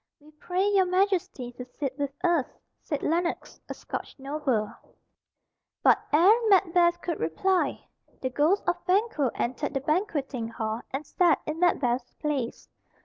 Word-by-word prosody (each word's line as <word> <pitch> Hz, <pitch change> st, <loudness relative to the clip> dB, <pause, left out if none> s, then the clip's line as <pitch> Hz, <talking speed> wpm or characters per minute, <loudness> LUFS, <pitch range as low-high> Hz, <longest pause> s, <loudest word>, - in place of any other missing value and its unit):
"We 300 Hz, +1 st, -19 dB
pray 360 Hz, +5 st, -1 dB
your 390 Hz, -2 st, +3 dB
Majesty 365 Hz, -9 st, 0 dB
to 250 Hz, +1 st, -8 dB
sit 265 Hz, +1 st, -5 dB
with 285 Hz, -1 st, -1 dB
us," 340 Hz, -7 st, +2 dB, 0.3 s
said 295 Hz, -4 st, -4 dB
Lennox, 340 Hz, +2 st, -1 dB
a -, -, -4 dB
Scotch -, -, -6 dB
noble; 270 Hz, -6 st, -1 dB, 1.1 s
but -, -, +6 dB
ere 340 Hz, +8 st, +7 dB, 0.2 s
Macbeth 350 Hz, -3 st, +4 dB
could 340 Hz, -, -3 dB
reply, 355 Hz, -, 0 dB, 0.3 s
the 260 Hz, -, -3 dB
ghost 310 Hz, +9 st, +2 dB
of 350 Hz, -, 0 dB
Banquo 370 Hz, -, +2 dB
entered 270 Hz, +4 st, -2 dB
the -, -, +2 dB
banqueting 290 Hz, -, -1 dB
hall 225 Hz, 0 st, -3 dB
and 275 Hz, +3 st, -4 dB
sat 340 Hz, -1 st, +3 dB
in 305 Hz, +1 st, -4 dB
Macbeth's 255 Hz, -8 st, +1 dB
place. 275 Hz, -6 st, -3 dB
305 Hz, 145 wpm, -27 LUFS, 260-360 Hz, 1.1 s, ere